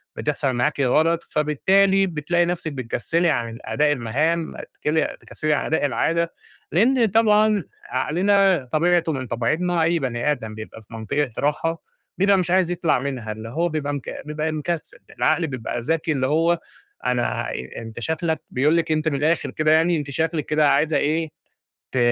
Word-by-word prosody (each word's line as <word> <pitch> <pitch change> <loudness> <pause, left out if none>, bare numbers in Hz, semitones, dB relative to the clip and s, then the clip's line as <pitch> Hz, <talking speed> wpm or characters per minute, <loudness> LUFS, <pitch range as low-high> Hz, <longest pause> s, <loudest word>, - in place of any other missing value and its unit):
بتحصَل 145 -2 -1
معاكِ 125 +4 0
غلط، 160 +6 +2
فبالتالي 190 +6 +3
بتلاقي 170 +1 0
نَفْسك 170 -2 -3
بتكسّلي 140 +7 0
عن 115 -5 -2
أداء 150 0 +1
المهام 150 +6 0 0.3
تكسّلي 155 +1 0
تكسّلي 155 0 -2
عن 145 - 0
أداء 160 -2 +1
العادة 165 +4 0 0.4
لإن 235 +7 +4
طبعًا 215 -1 +3 0.3
عقلنا 180 +2 +2
طبيعتُه 170 +1 +2
من 130 -4 -4
طبيعتنا 165 +10 0
أي 170 +1 +2
بني 130 +1 -1
آدم 110 -6 -4
بيبقى 110 +1 -9
في 110 - -18
منطقة 120 +5 -2
راحة 165 +3 -1 0.4
بيبقى 195 +1 +4
مش 180 -2 -1
عايز 185 -1 +3
يطلَع 170 -5 +1
منها، 130 -5 -4
اللي 110 +1 -7
هو 170 +8 0
بيبقى 150 -2 -2
مك 140 -3 -6
بيبقى 155 +1 -2
مكسّل 155 +1 -4 0.2
العقل 160 +2 +2
بيبقى 125 -3 -4
ذكي 160 +5 -1
اللي 130 -3 0
هو 165 +4 +2 0.5
أنا - - -1 0.2
أنت 115 0 -7
شكلك 160 +5 -1
بيقول 150 +6 +2
لِك 165 -1 0
أنتِ 155 0 0
من 150 - +1
الآخر 155 +4 0
كده 155 0 +1
يعني 165 +2 +4
أنتِ 145 -2 -4
شكلِك 160 +1 -1
كده 150 -1 +3
عايزة 150 +2 +2
إيه 160 +2 0 0.6
ت 130 - 0
155 Hz, 165 wpm, -22 LUFS, 135-170 Hz, 0.6 s, لإن